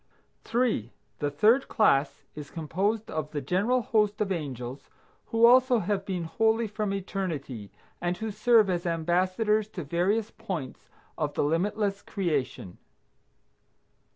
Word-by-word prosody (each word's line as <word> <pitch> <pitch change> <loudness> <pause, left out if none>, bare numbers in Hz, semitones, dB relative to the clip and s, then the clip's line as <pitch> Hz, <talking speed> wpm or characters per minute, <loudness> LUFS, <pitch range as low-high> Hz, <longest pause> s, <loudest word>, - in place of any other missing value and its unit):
3. 225 - 0 0.3
The 145 - 0
third 215 - +3
class 145 - +2
is 150 -1 -8
composed 195 +7 -2
of 155 -1 -3
the 150 - -3
general 200 - +1
host 210 -2 +1
of 205 -2 -1
angels 135 -6 -5 0.4
who 230 +1 +4
also 250 +1 +6
have 195 -1 -2
been 185 -3 -2
holy 220 +7 +1
from 210 -1 -3
eternity, 165 - -4 0.3
and 175 +1 -1
who 220 -1 -4
serve 215 +1 +4
as 175 -1 -1
ambassadors 185 +6 +1
to 195 -5 -7
various 190 +9 0
points 185 - -6 0.3
of 150 -2 -2
the - - +1
limitless 200 +6 0
creation. 145 - -3
190 Hz, 130 wpm, -27 LUFS, 155-215 Hz, 0.4 s, also